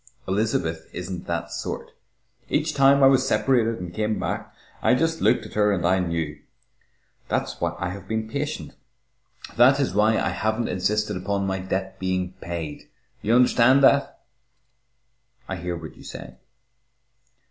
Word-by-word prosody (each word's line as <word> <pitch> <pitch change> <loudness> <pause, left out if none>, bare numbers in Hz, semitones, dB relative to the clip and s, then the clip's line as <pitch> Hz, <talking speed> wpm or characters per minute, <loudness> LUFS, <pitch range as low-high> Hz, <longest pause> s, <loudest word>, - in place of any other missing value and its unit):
Elizabeth 95 -5 -1
isn't 90 0 -6
that 85 0 -3
sort. - - -5 0.6
Each - - 0
time 140 0 +5
I - - +9
was 135 -1 +4
separated 115 -4 +2
and 90 -1 -7
came 110 +2 -1
back, - - -3 0.3
I 125 - +4
just 165 +4 0
looked 110 - +3
at - - -11
her 105 -1 +3
and 90 -4 0
I 95 +2 +3
knew. 85 -4 -2 0.9
That's - - -2
why - - -1
I 90 0 -2
have 100 0 -9
been 110 0 -2
patient. 145 +6 -4 0.8
That 130 +4 +6
is 135 -9 0
why 110 +2 +3
I - - 0
haven't 110 +3 -1
insisted 105 +3 0
upon 100 +2 -1
my 95 0 -1
debt 95 +1 -3
being 95 -1 -1
paid. 85 -3 -6 0.3
You 115 +3 +2
understand 125 +2 +5
that?" 140 +1 +4 1.3
"I 95 - -4
hear 90 0 -4
what 80 -1 -9
you - - -15
say." 65 -1 -9
100 Hz, 155 wpm, -24 LUFS, 90-115 Hz, 1.3 s, I